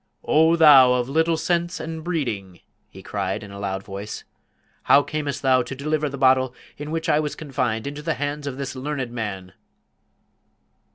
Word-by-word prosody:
"O 160 +2 +4
thou 140 -6 +7
of 125 -1 0
little 160 +4 +1
sense 175 +1 -1
and 160 0 -6
breeding!" 110 - -3 0.3
he - - -13
cried, - - -3
in 100 - -10
a 100 - -9
loud 95 -1 -3
voice; 100 +2 -7 0.6
"how 145 - +6
camest 145 -2 -4
thou 130 -1 +4
to 125 +2 -6
deliver 150 +2 -1
the 140 - -7
bottle 130 -1 +3 0.2
in 150 +1 -7
which 165 +1 -3
I 150 - +3
was 150 -1 -3
confined 130 -7 -2
into 145 +1 -5
the 160 +1 -1
hands 145 +1 -4
of 135 -2 -5
this 140 -1 -5
learned 130 -2 -4
man?" 100 -6 -5
140 Hz, 175 wpm, -23 LUFS, 120-155 Hz, 0.6 s, thou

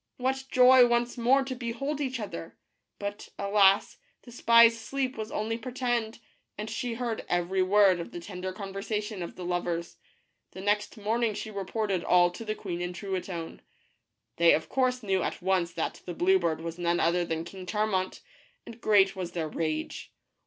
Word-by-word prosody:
What 265 +1 -1
joy 255 0 +7
once 240 0 +1
more 255 +3 +3
to 265 0 -4
behold 255 +5 -3
each 260 -3 -2
other! 170 -6 -7 0.4
But, 205 0 -6
alas, 200 -1 +3 0.2
the 240 - -13
spy's 230 -1 +6
sleep 265 +3 -2
was 220 0 -5
only 225 +2 -2
pretended, 240 -2 -2 0.4
and 215 +1 -5
she 235 +1 -3
heard 235 -2 -3
every 175 +2 +1
word 190 -1 +4
of 170 - -6
the 175 - -7
tender 180 +1 -6
conversation 205 +1 -4
of 170 - -6
the 180 - -7
lovers. 175 -1 -2 0.6
The 190 - -8
next 205 +2 0
morning 220 +1 0
she 220 - -5
reported 200 -1 -2
all 175 -1 +4
to 200 - -8
the 215 -1 -3
queen 175 -5 -5
and 175 0 -4
Truitonne. 185 -3 -5 0.8
They 170 0 +6
of 160 - -4
course 255 -2 0
knew 190 -2 +1
at - - -3
once 180 -2 +1
that - - -3
the 175 - -5
blue 190 +3 +4
bird 165 -2 -1
was 165 +1 -6
none 175 0 +1
other 175 +1 +2
than 165 -1 -3
King 185 +1 -9
Charmant, 205 -3 -1 0.4
and 230 0 -11
great 195 -2 +4
was 180 -2 -5
their 160 -3 -2
rage. 155 0 -3
200 Hz, 175 wpm, -28 LUFS, 180-230 Hz, 0.8 s, joy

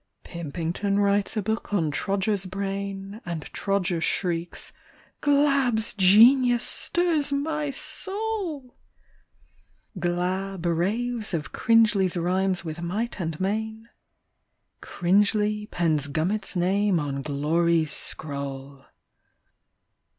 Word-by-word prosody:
Pimpington 170 +4 -3
writes 200 +1 +1
a 210 - 0
book 220 +2 -3
on 165 -7 +1
Trodger's 195 +4 -1
brain. 195 +2 -5
And 170 -3 -5
Trodger 190 -4 -1
shrieks: 170 -1 -1 0.2
" - - -31
Glabb's 275 -6 +2
genius 235 +5 +6
stirs 335 -5 +2
my 300 +1 -1
soul! 335 - -3 0.4
' - - -38
' 190 - -16
Glabb 180 +1 -2
raves 210 +5 0
of 155 -2 -4
Cringely's 215 -6 +3
rhymes 185 +1 0
with 160 +1 -5
might 210 +7 -3
and 160 -3 -3
main; 220 +3 -3 0.9
Cringely 210 +3 +1
pens 155 -5 +1
Gummit's 175 +10 -2
name 190 +1 +2
on 140 -2 -3
glory's 155 +2 +1
scroll. 140 -2 -5
195 Hz, 100 wpm, -25 LUFS, 170-225 Hz, 0.9 s, genius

